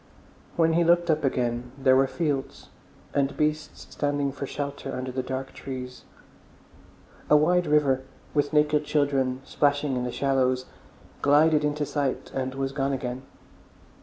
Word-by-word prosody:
When 165 -1 +3
he 170 +1 +3
looked 175 0 +3
up 155 0 0
again 125 -2 -1
there 130 -1 +4
were 135 +1 +4
fields, 145 -3 -3 0.4
and 140 -1 0
beasts 150 0 -2
standing 145 -1 -1
for 140 0 -6
shelter 140 -1 -5
under 130 0 -4
the 130 +1 -2
dark 130 +1 -5
trees. 125 -1 -7 1.2
A 150 - +7
wide 175 +3 +3
river, 145 -3 +3 0.3
with 145 -1 +1
naked 150 0 +3
children 135 -3 0
splashing 145 -1 +1
in 125 - -1
the 125 - -3
shallows, 130 -2 +1 0.6
glided 150 +2 +4
into 150 0 0
sight 140 -2 -2
and 130 0 -3
was 135 0 -2
gone 135 0 -1
again. 125 -1 -4
140 Hz, 145 wpm, -26 LUFS, 130-150 Hz, 1.2 s, A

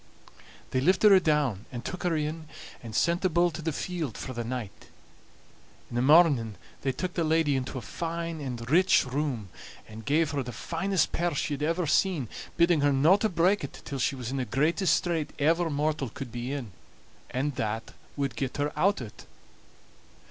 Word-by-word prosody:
They 130 - +1
lifted 185 +7 +5
her 195 - +8
down 145 - +1
and 120 -1 -6
took 185 - -5
her 175 -2 +1
in, 155 +1 -3 0.3
and 115 -3 -8
sent 170 +2 +2
the 185 - +2
bull 175 +1 +3
to 165 - -7
the 160 +1 -1
field 160 - -4
for 130 - -6
the 120 -1 -3
night. 115 -4 -6 1.0
In - - -5
the 120 - +2
morning 140 - +5 0.3
they 135 - 0
took 180 +7 -4
the 170 - 0
lady 160 -2 +2
into 130 0 -3
a 125 - -5
fine 165 +1 -4
and 120 -4 -5
rich 180 +5 +4
room, 130 -6 -2 0.4
and 110 +1 -10
gave 150 +4 +2
her 145 -2 -1
the 125 -1 -5
finest 180 +5 -1
pear 170 -2 0
she 145 - -1
had 145 - -4
ever 165 +3 0
seen, 155 - +1 0.3
bidding 170 -2 +4
her 145 0 +4
no 145 +7 +5
to 220 +1 0
break 185 +2 +2
it 140 - -8
till 140 - -4
she 135 - +1
was 125 -2 -5
in 135 - -2
the 130 - -1
greatest 160 +7 +2
strait 165 -3 -1
ever 165 +3 +2
mortal 150 -2 -1
could 130 +1 -8
be 120 +2 -4
in, 135 -7 -4 0.6
and 140 +3 -1
that 110 +1 -3 0.2
wad 140 -4 -1
get 130 +3 -3
her 145 +1 -1
out 185 -1 +2
o't. 105 - -12
150 Hz, 195 wpm, -28 LUFS, 130-170 Hz, 1.0 s, her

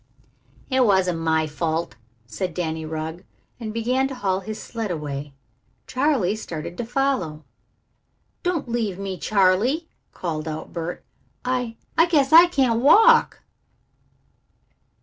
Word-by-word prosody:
"It 260 0 +4
wasn't 190 -6 +2
my 160 -1 +1
fault," 160 +2 -2 0.3
said 170 - -4
Danny 160 -2 -3
Rugg, 160 +2 -5 0.4
and 220 -3 -5
began 250 +4 0
to 270 - -7
haul 190 -6 0
his 215 +2 -7
sled 225 -3 -5
away. 145 -4 -5 0.5
Charley 255 -8 +1
started 170 -5 -6
to 240 - -2
follow. 240 - -1 1.0
"Don't 350 -7 -1
leave 225 -6 -2
me, 195 -2 -5
Charley," 215 - +2 0.2
called 160 -3 -4
out 155 0 -6
Bert. 170 0 -5 0.4
"I 250 -2 -1 0.2
I 330 - +6
guess 300 -4 +2
I 335 +2 +10
can't 260 -9 +1
walk." 450 - +5
200 Hz, 125 wpm, -23 LUFS, 165-260 Hz, 1.0 s, I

